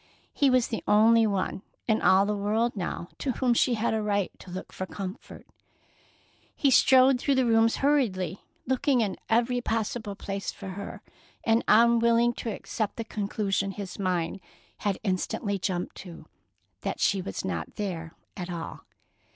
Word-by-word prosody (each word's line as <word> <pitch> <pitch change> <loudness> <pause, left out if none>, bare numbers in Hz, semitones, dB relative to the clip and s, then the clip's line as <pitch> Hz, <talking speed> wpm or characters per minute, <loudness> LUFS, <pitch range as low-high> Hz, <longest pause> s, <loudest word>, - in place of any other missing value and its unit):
He 280 - +3
was 255 -2 +3
the 225 - -3
only 225 +2 +5
one 195 -2 -2 0.3
in 220 -2 +2
all 190 +1 +5
the 210 +1 -1
world 220 +4 0
now 175 -2 -4
to 265 - -1
whom 250 -1 +2
she 240 +1 +2
had 225 +1 0
a 220 - 0
right 205 -2 0
to - - -12
look 185 +1 -7
for 185 - -5
comfort. 195 +2 -8 1.1
He 280 - +2
strode 260 0 +6
through 275 +2 +1
the 260 -1 +3
rooms 225 0 +4
hurriedly, 195 - +1 0.2
looking 260 0 +2
in 205 -4 -1
every 245 +2 +2
possible 225 -2 -2
place 195 0 -4
for 195 - -9
her, 200 +2 -7 0.4
and 225 +1 +3
unwilling 235 +1 +5
to 230 - -3
accept 215 0 -3
the 230 - -4
conclusion 200 -2 -2
his 195 -1 -7
mind 185 -1 -1 0.4
had 200 -2 -1
instantly 200 +1 -1
jumped 180 -1 -3
to, 175 -3 -10 0.6
that - - -3
she 195 -2 +2
was 95 - -5
not 85 -3 -4
there 170 -6 -4 0.2
at 180 -2 -6
all. 170 -2 -6
210 Hz, 160 wpm, -27 LUFS, 190-235 Hz, 1.1 s, strode